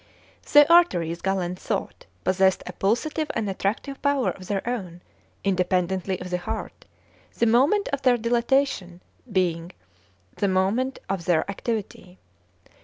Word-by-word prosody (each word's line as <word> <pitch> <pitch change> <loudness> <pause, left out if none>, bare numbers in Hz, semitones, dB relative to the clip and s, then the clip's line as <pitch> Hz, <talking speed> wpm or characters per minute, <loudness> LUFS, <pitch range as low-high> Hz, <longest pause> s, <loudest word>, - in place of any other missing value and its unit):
The 295 0 +8
arteries, 175 - +3
Galen 185 -2 -1
thought, - - -4 0.2
possessed 190 0 +2
a 180 - -7
pulsative 295 - -1
and 220 - -1
attractive 205 +8 -3
power 275 -8 +1
of 185 +1 -11
their 200 +1 -2
own, 185 -8 -4 0.4
independently 185 0 0
of 180 0 -7
the 180 - 0
heart, 220 +5 -6 0.5
the - - +3
moment 270 - +3
of 280 -1 -2
their 250 -2 +4
dilatation 235 -6 0 0.3
being 175 -2 0 0.6
the 200 - +1
moment 195 +8 +1
of 190 -4 -3
their 170 -3 +2
activity. 200 -3 -5
195 Hz, 130 wpm, -24 LUFS, 180-245 Hz, 0.6 s, The